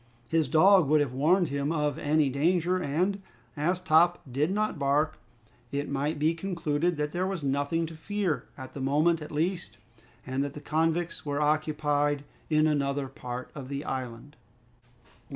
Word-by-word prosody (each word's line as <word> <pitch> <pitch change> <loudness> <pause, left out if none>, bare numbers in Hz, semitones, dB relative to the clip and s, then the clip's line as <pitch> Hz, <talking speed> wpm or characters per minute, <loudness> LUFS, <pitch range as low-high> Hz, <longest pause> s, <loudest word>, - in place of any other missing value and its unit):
His 160 -2 +1
dog 185 +1 +6
would 155 +2 +4
have 140 -4 0
warned 165 +6 +3
him 140 +2 -1
of 150 -3 0
any 150 0 +2
danger, 175 +6 +1
and, 180 +7 0 0.3
as 175 +5 0
Top 175 0 +4
did 145 +6 +1
not 210 +2 -1
bark, 145 +3 +1 0.5
it 140 +1 -2
might 145 +3 -1
be 155 +3 +2
concluded 170 -2 -1
that 150 0 -1
there 180 +3 -1
was 190 -5 -4
nothing 145 +4 0
to 165 - -8
fear 190 0 -2
at 130 -1 -9
the 140 - -6
moment 155 +5 +2
at 150 - -8
least, 170 +4 -2 0.5
and 130 +2 -1
that 140 -1 -4
the - - -6
convicts 165 +3 -1
were 145 -1 -2
occupied 150 -1 +1 0.3
in 155 -1 +3
another 140 -2 0
part 125 -1 -7
of 135 -3 -8
the 140 +1 -4
island. 130 +2 -5
150 Hz, 165 wpm, -28 LUFS, 140-170 Hz, 0.5 s, dog